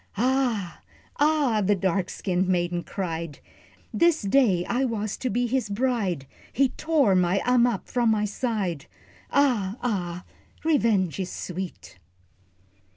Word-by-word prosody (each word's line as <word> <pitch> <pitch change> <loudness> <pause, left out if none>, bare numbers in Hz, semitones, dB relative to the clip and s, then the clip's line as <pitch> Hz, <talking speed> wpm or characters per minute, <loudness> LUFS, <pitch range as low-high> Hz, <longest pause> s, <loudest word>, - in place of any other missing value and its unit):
"Ah, 240 -6 0 0.4
ah," 290 -7 +3
the 205 +2 +3
dark 190 -1 0
skinned 185 -1 -1
maiden 175 -1 0
cried, 165 -5 -4 0.6
"This 335 -6 +3
day 200 -5 +3
I 250 +3 0
was 215 -5 -2
to 255 - -2
be 245 +3 0
his 245 -2 -1
bride, 200 - -1 0.3
He 270 +1 +2
tore 300 -10 +2
my 180 +1 +2
Ammap 245 -4 +2
from 240 -3 +1
my 215 -1 +2
side, 205 - -2 0.4
Ah, 240 -8 +1
ah, 180 -7 -2 0.4
revenge 225 - +2
is 185 -2 -3
sweet." 180 - -7
210 Hz, 125 wpm, -25 LUFS, 185-250 Hz, 0.6 s, ah